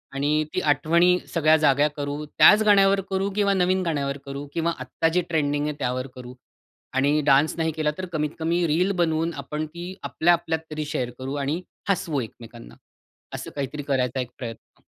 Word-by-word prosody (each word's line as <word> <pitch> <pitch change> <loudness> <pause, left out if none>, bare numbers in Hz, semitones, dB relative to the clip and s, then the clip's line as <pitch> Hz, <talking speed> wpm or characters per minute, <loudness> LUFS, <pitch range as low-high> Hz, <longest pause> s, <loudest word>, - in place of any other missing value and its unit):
आणि 150 +2 +1
ती - - 0
आठवणी 170 +5 +4 0.2
सगळ्या 155 -2 +4
जाग्या 145 0 +4
करू, 145 +1 -3
त्याच 210 +8 +6
गाण्यावर 195 -2 +5
करू 195 +1 0
किंवा 200 -1 +2
नवीन 185 0 +2
गाण्यावर 140 -5 -1
करू 140 +1 -6
किंवा 170 0 0
आत्ता 130 +5 -1
जे 180 - +3
ट्रेंडिंग 145 -3 0
आहे 150 - -2
त्यावर 130 0 -2
करू. 125 -1 -9 0.6
आणि 140 +3 +2
डान्स 145 +2 +4
नाही 160 -1 0
केला 155 -1 -1
तर 185 - -4
कमीत 150 -1 0
कमी 170 +2 +1
रील 175 +6 +2
बनवून 165 0 0
आपण 150 +2 -4
ती 175 +4 -8
आपल्या 175 +2 +2
आपल्यात 165 -1 -1
तरी 155 0 -3
शेअर 130 -4 -2
करू 130 +1 -4
आणि 150 +6 -1 0.3
हसवू 160 -7 0
एकमेकांना, 115 - -11 0.6
असं - - -7
काहीतरी 145 +1 -4
करायचा 130 -2 0
एक 125 - -6
प्रयत्न. 115 -3 -9
150 Hz, 175 wpm, -24 LUFS, 140-170 Hz, 0.6 s, त्याच